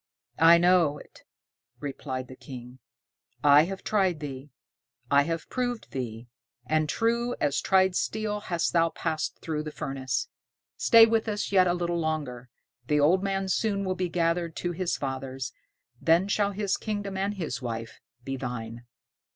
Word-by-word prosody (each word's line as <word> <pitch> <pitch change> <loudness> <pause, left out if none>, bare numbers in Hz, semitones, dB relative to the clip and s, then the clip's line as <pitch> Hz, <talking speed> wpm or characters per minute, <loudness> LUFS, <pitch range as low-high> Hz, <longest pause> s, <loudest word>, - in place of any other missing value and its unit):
"I 165 +2 +8
know 175 -4 +4
it," - - -15 0.6
replied 130 -2 -5
the 130 - -11
King; 125 -1 -10 0.6
"I 145 +1 +7
have 190 +2 -6
tried 190 -6 +1
thee, 140 -1 -7 0.6
I 140 0 +6
have 165 -1 -3
proved 245 -2 -3
thee, 120 -3 -5 0.4
and 155 +2 +1
true 235 +2 0
as 145 -1 +1
tried 190 -1 +3
steel 215 0 -1
hast 175 -5 -1
thou 165 -1 +4
passed 160 -1 -3
through 155 -2 -2
the 155 0 -6
furnace. 135 -3 -3 0.5
Stay 230 -2 +7
with 225 0 +1
us 205 -1 -2
yet 185 -2 +5
a 175 - +2
little 175 -1 -1
longer, 145 -6 -3 0.4
the 150 0 +2
old 170 +6 +4
man 195 -1 -1
soon 200 0 0
will 185 - 0
be 185 -1 -2
gathered 170 -1 0
to 175 - -2
his 175 0 -1
fathers, 135 -2 -4 0.5
then 170 +4 +4
shall 205 0 +1
his 200 0 -1
kingdom 205 -2 -4
and 200 +2 -1
his 155 - -4
wife 115 -2 -5 0.2
be 135 +1 -4
thine." 120 -2 -6
165 Hz, 160 wpm, -27 LUFS, 135-195 Hz, 0.6 s, I